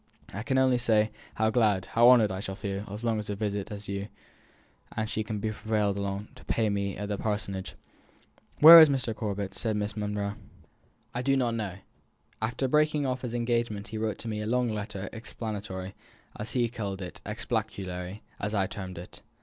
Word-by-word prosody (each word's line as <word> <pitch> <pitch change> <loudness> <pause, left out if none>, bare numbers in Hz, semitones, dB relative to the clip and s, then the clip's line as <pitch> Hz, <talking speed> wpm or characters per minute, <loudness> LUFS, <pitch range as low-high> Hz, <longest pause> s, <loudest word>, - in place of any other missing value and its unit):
I 100 - -4
can 130 +3 0
only 130 -1 +4
say 110 -2 +3 0.2
how 110 0 +2
glad, 105 -5 +2
how 120 +1 +5
honoured, 115 -5 +6
I 95 - -3
shall 95 -1 -5
feel 100 0 -4
by - - -11
as 105 +3 -6
long 115 -2 +1
a 105 -1 -3
visit 100 -1 -2
as 105 0 -6
you 100 0 -3 0.9
and 110 0 0
she 110 - -1
can 105 0 -4
be 110 +2 -2
prevailed 105 -2 0
upon 100 +1 -3
to - - -15
pay 110 -2 +1
me 100 -1 -2
at 105 +1 -4
the 100 -1 -3
Parsonage." 105 -3 -2 0.9
"Where 165 +2 +13
is 160 -2 +9
Mr. 125 -5 0
Corbet?" 100 -3 -3
said 110 0 -1
Miss 105 +1 -2
Monro. 105 -1 -2 0.8
"I 120 - -2
do 135 +1 +2
not 120 -3 +1
know. 105 -5 -3 0.7
After 120 +4 0
breaking 150 +1 +2
off 130 -1 -1
his 120 -2 -4
engagement 115 -3 -1
he 110 - -4
wrote 110 0 -3
me 110 -2 -3
a 105 - -3
long 125 +1 +1
letter, 100 -2 -4
explanatory, 105 -4 -5 0.4
as 105 - -5
he 120 -2 +2
called 100 -5 -4
it; 90 - -8
exculpatory, 105 -4 -4 0.2
as 105 +2 -2
I 95 -2 +2
termed 95 -2 -7
it. 85 - -10
105 Hz, 190 wpm, -28 LUFS, 100-115 Hz, 0.9 s, Where